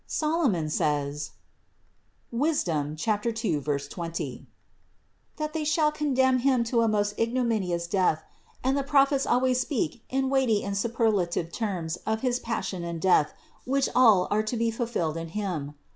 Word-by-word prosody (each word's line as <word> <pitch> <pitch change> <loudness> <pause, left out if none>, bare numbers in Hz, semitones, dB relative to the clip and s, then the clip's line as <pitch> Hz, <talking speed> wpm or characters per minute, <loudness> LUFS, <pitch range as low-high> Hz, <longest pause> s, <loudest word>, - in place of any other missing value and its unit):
Solomon 300 - 0
says 145 -1 -1 1.0
(Wis. 290 +6 +1
2, 150 -3 -2
20), 170 - -2 0.9
that 305 0 -3
they 320 -1 -2
shall 305 0 +2
condemn 260 -4 +2
Him 255 -1 +3
to 235 0 +1
a 230 - +3
most 205 -1 +1
ignominous 225 -8 0
death 170 -4 +1 0.4
and 265 +2 +2
the 280 - +1
Prophets 275 -1 +3
al 250 - +3
ways 255 -1 +2
speak 240 - -2
in 265 0 0
weighty 255 -6 +2
and 200 0 -3
superlative 200 -6 0
terms 180 -7 -3
of 220 +3 -2
his 250 -1 0
Pas 230 -2 -3
sion 180 -3 -4
and 170 -1 -4
Death, 160 -4 +3 0.3
which 275 +1 +1
all 220 -8 +5
are 210 - +3
to 215 +3 -3
be 230 0 +1
fulfilled 225 -9 -2
in 165 0 -4
Him. 160 -8 -3
220 Hz, 150 wpm, -27 LUFS, 170-260 Hz, 1.0 s, all